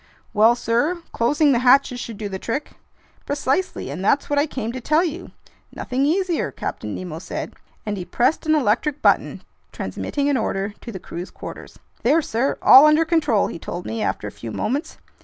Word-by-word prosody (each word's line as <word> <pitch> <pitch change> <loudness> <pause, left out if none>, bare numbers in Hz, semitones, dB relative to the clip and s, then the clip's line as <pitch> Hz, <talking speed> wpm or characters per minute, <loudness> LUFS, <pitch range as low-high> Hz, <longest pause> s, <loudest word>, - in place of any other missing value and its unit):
"Well, 220 +3 +5
sir, 245 +9 0
closing 290 +5 +2
the 240 - +3
hatches 250 0 +4
should 230 -3 -6
do 210 -1 -4
the 190 -1 -5
trick." 265 +9 -3 0.6
"Precisely, 285 - -1
and 165 +7 -5
that's 280 +8 +1
what 290 - +3
I 295 - +2
came 235 -6 -4
to 255 +1 -6
tell 305 +7 +2
you—" 345 +2 -5 0.4
"Nothing 265 +3 -1
easier," 350 - 0
Captain 105 -4 -5
Nemo 170 -3 -6
said. - - -6 0.3
And 210 -1 -3
he 180 - -5
pressed 245 - 0
an 310 - +4
electric 290 +3 0
button, - - +2 0.3
transmitting 285 -1 -3
an 285 -2 +2
order 200 -2 -2
to 235 - -7
the 195 - -6
crew's 175 0 -7
quarters. - - -10 0.2
"There, 300 +7 +3
sir, 255 +1 -1
all 270 +4 +9
under 305 +2 +4
control!" 305 - +2
he - - -6
told 175 +2 -6
me 225 -1 -4
after - - -2
a - - -6
few - - -8
moments. 275 +7 -3
250 Hz, 190 wpm, -22 LUFS, 215-295 Hz, 0.6 s, all